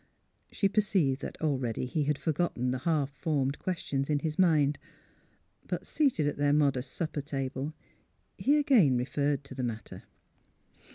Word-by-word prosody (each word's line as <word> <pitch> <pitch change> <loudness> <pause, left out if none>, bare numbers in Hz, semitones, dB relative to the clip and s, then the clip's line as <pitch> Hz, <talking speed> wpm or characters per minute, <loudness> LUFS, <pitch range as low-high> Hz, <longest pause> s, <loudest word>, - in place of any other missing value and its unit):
She 200 - +2
perceived 190 -10 +1
that - - -6
already 130 -6 0
he 145 +3 -1
had 150 -1 +1
forgotten 150 -6 -1
the 130 - -2
half 145 -1 0
formed 140 -2 -1
questions 145 -6 -2
in 150 - +3
his 155 +2 -3
mind. 150 -5 +3 0.9
But - - -3
seated 270 - +1
at 145 - -1
their 145 0 +2
modest 140 -3 +1
supper 155 -3 -2
table, 135 0 -3 0.6
he 290 +2 +3
again 230 - +4
referred 140 +3 0
to 140 - -10
the 130 - -4
matter. 115 -2 -5
145 Hz, 150 wpm, -30 LUFS, 135-160 Hz, 0.9 s, again